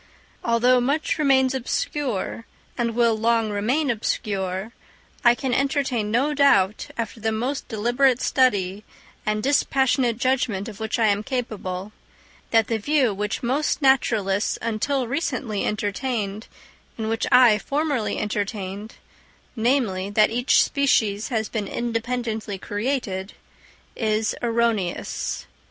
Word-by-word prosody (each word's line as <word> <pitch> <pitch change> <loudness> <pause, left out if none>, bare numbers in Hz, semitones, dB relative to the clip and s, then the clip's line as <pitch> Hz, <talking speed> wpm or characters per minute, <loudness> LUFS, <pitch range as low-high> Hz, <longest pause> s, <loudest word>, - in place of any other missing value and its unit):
Although 245 +2 +3
much 290 +5 0
remains 265 -3 +3
obscure, 255 -3 -2 0.3
and 235 -2 -1
will 235 -2 +3
long 225 0 +1
remain 245 +8 +1
obscure, 200 -2 -2 0.5
I 240 -1 +6
can 260 -1 -2
entertain 270 -5 0
no 265 +7 +1
doubt, 215 -9 +3
after 230 0 -4
the 220 0 -1
most 250 +6 -2
deliberate 245 +3 +2
study 205 -8 +1 0.4
and 215 0 0
dispassionate 265 -3 +2
judgment 245 -6 0
of 220 -2 -9
which 220 0 -2
I 230 - +3
am 205 -1 +2
capable, 210 -6 -4 0.6
that 225 -1 +4
the 225 0 -1
view 270 -2 +2
which 210 +4 -3
most 275 +5 0
naturalists 220 -7 +2
until 240 +4 -1
recently 255 - -2
entertained, 210 0 -2 0.5
and 220 -1 -3
which 225 0 -1
I 245 -4 +6
formerly 285 -5 -1
entertained—namely, 205 +1 -3
that 210 +1 +3
each 245 +3 +4
species 220 -7 +1
has 220 -4 -1
been 215 -3 -3
independently 230 -3 -3
created—is 215 0 -4
erroneous. 230 -6 -1
230 Hz, 115 wpm, -23 LUFS, 210-255 Hz, 0.6 s, I